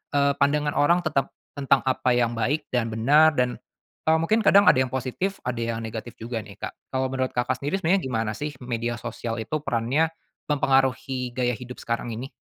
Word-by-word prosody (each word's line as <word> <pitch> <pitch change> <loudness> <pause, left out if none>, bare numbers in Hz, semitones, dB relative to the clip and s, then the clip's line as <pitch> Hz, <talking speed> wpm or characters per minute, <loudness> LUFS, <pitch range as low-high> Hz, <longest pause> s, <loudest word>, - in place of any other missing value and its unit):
eee, 140 0 +4
pandangan 150 +1 +2
orang 170 +4 +4
tetap 140 -4 -1 0.2
tentang 140 -1 +2
apa 130 -1 +1
yang 120 -1 +2
baik 145 +7 0
dan 120 -2 +1
benar 145 +8 +4
dan, 125 -1 0 0.5
eee, 160 - +5
mungkin 215 +7 +2
kadang 200 +1 +7
ada 130 - +5
yang 130 - +2
positif 130 +10 -3
ada 125 -1 -3
yang 115 -1 -2
negatif 110 +1 -6
juga 115 +1 -5
nih 100 -3 -10
Kak. - - -6 0.2
Kalau 130 0 0
menurut 130 -1 -2
Kakak 120 0 0
sendiri 170 +7 -2
sebenarnya 185 +4 +3
gimana 115 -3 -1
sih 150 -1 -4
media 120 -1 -2
sosial 115 0 -5
itu 155 +7 -2
perannya, 135 +3 +1 0.4
mempengaruhi 135 -3 +1
gaya 125 -1 +1
hidup 125 0 -9
sekarang 115 0 -3
ini? 130 +5 -6
130 Hz, 190 wpm, -25 LUFS, 120-145 Hz, 0.5 s, kadang